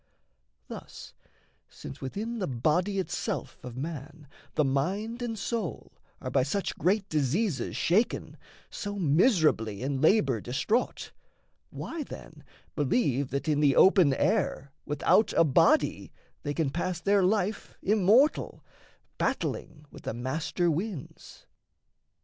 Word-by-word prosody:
Thus, - - -10 0.6
since - - -10
within 220 - -4
the 185 - -1
body 155 - 0
itself 190 - -3
of 125 -1 -8
man 150 +1 -7 0.3
The 150 - +3
mind 195 - -1
and 230 -2 -3
soul 210 -3 -4 0.3
are 130 - -5
by 135 - +3
such 170 +10 -2
great 195 +2 +1
diseases 150 - 0
Shaken, 205 +8 +1 0.4
so 205 -1 -5
miserably 155 - +2
in 135 0 -2
labour 145 - +3
distraught, 210 - -1 0.6
Why, 330 - -6
then, - - -10 0.3
believe 140 - +1
that 140 +4 -3
in 150 -2 +2
the 145 -2 +4
open 185 -6 +6
air, 140 +1 0 0.2
Without 150 +9 +2
a - - +5
body, 165 - +2 0.3
they 145 -1 -3
can 155 -5 0
pass 175 +2 -2
their 200 +3 +3
life, 200 +2 0
Immortal, 215 +8 +3 0.6
battling 150 -2 -2
with - - -12
the - - -3
master 155 +7 -1
winds? 175 -1 -6
165 Hz, 120 wpm, -28 LUFS, 140-205 Hz, 0.6 s, open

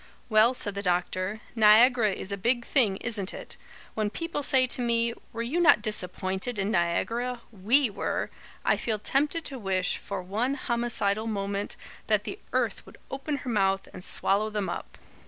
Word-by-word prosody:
"Well," 225 +3 +5
said 205 -4 -5
the 200 - -3
doctor, 185 +3 -1
"Niagara 225 +1 +6
is 190 +1 -5
a - - 0
big 235 +4 0
thing 220 -9 +2
isn't 210 -5 -2
it? - - -7 0.4
When 215 -1 0
people 330 +5 -3
say 265 -2 +3
to 250 0 0
me, 235 -1 +1 0.2
'Were 230 - -3
you 275 +9 -1
not 335 -11 +6
disappointed 190 +2 -2
in 200 +1 0
Niagara? 230 +8 0
WE 230 +7 +3
were!' 200 - -2 0.3
I - - +3
feel 220 -2 -1
tempted 295 +9 0
to 270 -2 -5
wish, 190 -3 0
for 195 -2 -5
one 225 +9 -1
homicidal 235 -5 -1
moment, 200 -1 -2 0.3
that 210 -2 +2
the 380 - -6
earth - - 0
would - - -15
open 275 +2 -3
her - - -3
mouth 195 -2 +1
and 180 - -8
swallow 205 +3 +1
them 210 -2 -2
up. - - -6
215 Hz, 175 wpm, -27 LUFS, 195-245 Hz, 0.4 s, Niagara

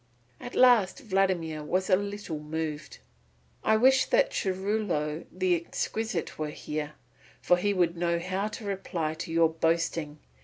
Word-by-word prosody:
At 245 - -8
last 235 -7 +5
Vladimir 185 - 0
was 185 +5 -1
a 185 - +5
little 200 -5 -4
moved. 155 -1 -5 0.7
"I 220 - +4
wish 260 +3 +5
that - - +3
Churilo 190 - -1
the 185 -1 +1
Exquisite 175 +2 -3
were 155 -1 -2
here, 150 0 -5 0.5
for 180 - +3
he 205 +3 +1
would 175 -3 +1
know 170 0 0
how 185 +4 -2
to 215 0 -8
reply 175 -5 -2
to 165 +1 -6
your 165 0 +4
boasting." 165 -1 -1
180 Hz, 145 wpm, -28 LUFS, 160-200 Hz, 0.7 s, last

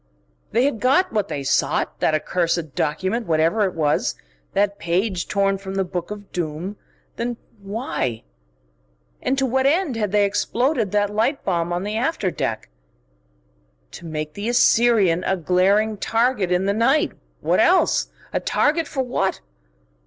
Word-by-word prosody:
They 240 +4 +3
had 275 -6 0
got 275 - +2
what 210 -2 0
they 140 -6 -4
sought, 135 - 0
that 155 - +2
accursed 165 -1 -1
document, 190 - -1
whatever 165 +6 +2
it 190 - -3
was, 150 -2 +1 0.4
that 200 0 +1
page 180 +2 -1
torn 195 -1 +1
from 190 0 -6
the 195 - +1
Book 180 -1 -5
of 205 -1 -8
Doom. 170 +3 -4 0.4
Then 235 0 -2 0.2
why...? 195 - -3 1.0
And 270 - 0
to 270 - +2
what 265 +1 +2
end 315 -2 +1
had 210 -3 -1
they 205 0 +4
exploded 230 +2 0
that 205 -1 +1
light 230 +7 0
bomb 170 -2 0
on 175 +1 -1
the 210 +2 -2
after 240 - 0
deck? 110 - -3 1.2
To 170 - -10
make 155 -1 -4
the 205 +5 -3
Assyrian 225 -7 +4
a 190 - 0
glaring 195 +5 +2
target 225 -4 +1
in 180 +1 +2
the 200 - +2
night 260 +8 +2 0.3
what - - +2
else? - - +3 0.3
A - - +1
target 320 +1 +1
for 265 -2 -2
what?... 245 -6 -1
200 Hz, 155 wpm, -22 LUFS, 175-235 Hz, 1.2 s, they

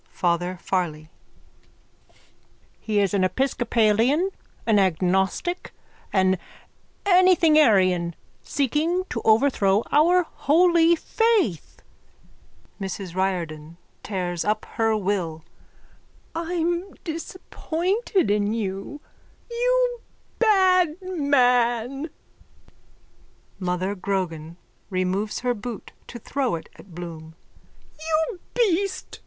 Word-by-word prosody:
_ - - -41
FATHER 175 +1 -1
FARLEY: 160 -4 -2 1.7
He 215 -2 -1
is 200 -1 +1
an 195 -2 +2
episcopalian, 240 - +2 0.3
an 220 -3 +4
agnostic, 190 - 0 0.4
an 190 -1 +2 0.7
anythingarian 305 - +4 0.3
seeking 305 +7 0
to 230 - -3
overthrow 220 -3 +3
our 350 +5 +4
holy 340 +2 +3
faith. 405 - 0 1.0
MRS 190 -2 -5
RIORDAN: 170 -4 -3 0.2
(Tears 180 -4 -3
up 215 +1 -1
her 225 -1 +1
will.) 180 -6 -2 0.9
I'm 345 +2 -2
disappointed 355 - -2
in 205 0 +1
you! 200 +6 -4 0.5
You - - +1 0.4
bad 370 -6 +4
man! 270 - +1 1.5
MOTHER 185 +1 -1
GROGAN: 175 -4 -3 0.3
(Removes 190 +2 -1
her 250 0 +1
boot 230 0 -7 0.2
to 240 - -8
throw 255 -2 -2
it 160 - -9
at 180 -5 -15
Bloom.) 160 -2 -8 0.6
You 320 +5 -1 0.2
beast! 395 -4 0
225 Hz, 85 wpm, -24 LUFS, -, 1.7 s, an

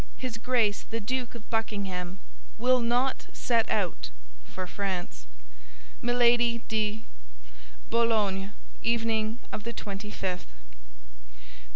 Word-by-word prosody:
His 250 -3 -4
Grace 230 -4 +2
the 230 - -1
Duke 245 +3 -2
of 230 - -9
Buckingham 195 -5 -1 0.4
will 255 +3 +4
not 245 +3 +1
set 230 -2 +2
out 175 - 0 0.4
for 185 - -5
France. 180 - -3 0.7
"MILADY 240 -1 +4
DE 215 0 0 0.4
—— - - -21
"BOULOGNE, 210 -4 +3 0.3
evening 225 -1 +2
of 210 - -4
the 235 +1 -3
twenty 200 -1 -5
fifth. 185 -3 -3
220 Hz, 105 wpm, -29 LUFS, 195-235 Hz, 0.7 s, will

